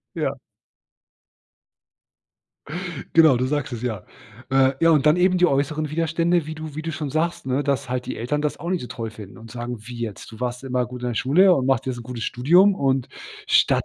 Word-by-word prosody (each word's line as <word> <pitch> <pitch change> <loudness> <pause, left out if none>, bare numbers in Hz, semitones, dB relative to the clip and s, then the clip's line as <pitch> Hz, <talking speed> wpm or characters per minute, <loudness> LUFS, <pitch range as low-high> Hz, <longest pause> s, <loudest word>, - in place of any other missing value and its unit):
Ja. - - -1 2.8
Genau, 160 -5 +6
du 125 - 0
sagst 145 -1 -2
es, 120 -1 -5
ja. 110 -7 -3 0.5
Äh, 135 0 +4
ja, 165 - +5
und 155 -3 +3
dann 150 +2 +6
eben 180 +1 +3
die 180 - +5
äußeren 150 +2 0
Widerstände, 165 +1 +1
wie 155 - -5
du 155 -1 -8
wie 155 - -5
du 165 - -3
schon 150 -2 -4
sagst, 160 -2 -1
ne, 130 +2 0
dass 140 -1 -1
halt 125 0 -3
die - - -4
Eltern 135 +6 -2
das 150 - -2
auch 170 - -5
nicht 185 -2 0
so - - -6
toll 115 -2 -5
finden 105 -3 -11
und 115 -1 -12
sagen: 120 +1 -5
„Wie 120 +2 -9
jetzt, 110 -4 -6
du 110 - -12
warst 125 +1 -3
immer 125 -2 -1
gut 125 0 -9
in 125 - -1
der 120 - -3
Schule 175 - +5
und 130 -5 0
machst 135 -2 +1
jetzt 130 -2 -3
'n - - -7
gutes 120 -1 -6
Studium 175 +11 +4
und 135 -6 0 0.4
statt - - +3
135 Hz, 215 wpm, -23 LUFS, 125-155 Hz, 2.8 s, Genau